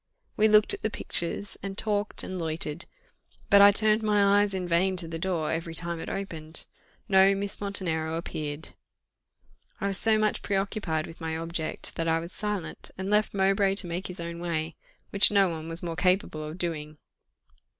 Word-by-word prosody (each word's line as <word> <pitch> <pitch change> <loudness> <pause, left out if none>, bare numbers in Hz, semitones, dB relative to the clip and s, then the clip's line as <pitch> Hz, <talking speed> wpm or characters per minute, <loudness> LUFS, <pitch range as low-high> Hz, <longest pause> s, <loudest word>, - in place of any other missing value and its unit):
We 215 - +4
looked 210 0 +5
at - - -5
the 215 - 0
pictures, 195 0 -5
and 195 0 -6
talked, 210 -1 -1
and 185 -1 -5
loitered, 160 0 -3 0.7
but 200 - +8
I 200 0 +9
turned 215 +1 +4
my 205 -1 +4
eyes 205 -1 +1
in 180 -1 -3
vain 185 +2 +2
to 170 -2 -4
the 165 0 -5
door 170 -3 -1
every 165 0 -3
time 170 0 -4
it - - -6
opened 165 -5 -5 0.4
no 195 0 +5
Miss 200 +1 -4
Montenero 165 -5 0
appeared. 155 -2 -4 1.1
I - - -3
was 195 -1 0
so 220 -1 +4
much 215 -1 +1
preoccupied 195 -5 -1
with 165 - -12
my 160 0 -2
object 165 -1 -3
that 165 - -1
I 165 0 +3
was 170 +2 -6
silent, 210 -5 -3
and 190 +2 -3
left 210 0 +2
Mowbray 195 0 +2
to 200 - 0
make 175 +3 -4
his 180 -1 -6
own 170 0 -5
way, 165 -2 -2 0.4
which 200 0 +6
no 200 -2 +4
one 160 -1 -5
was 165 +2 -1
more 170 -1 -3
capable 180 -3 +1
of 155 +3 -7
doing. 155 -4 -3
180 Hz, 185 wpm, -27 LUFS, 165-200 Hz, 1.1 s, I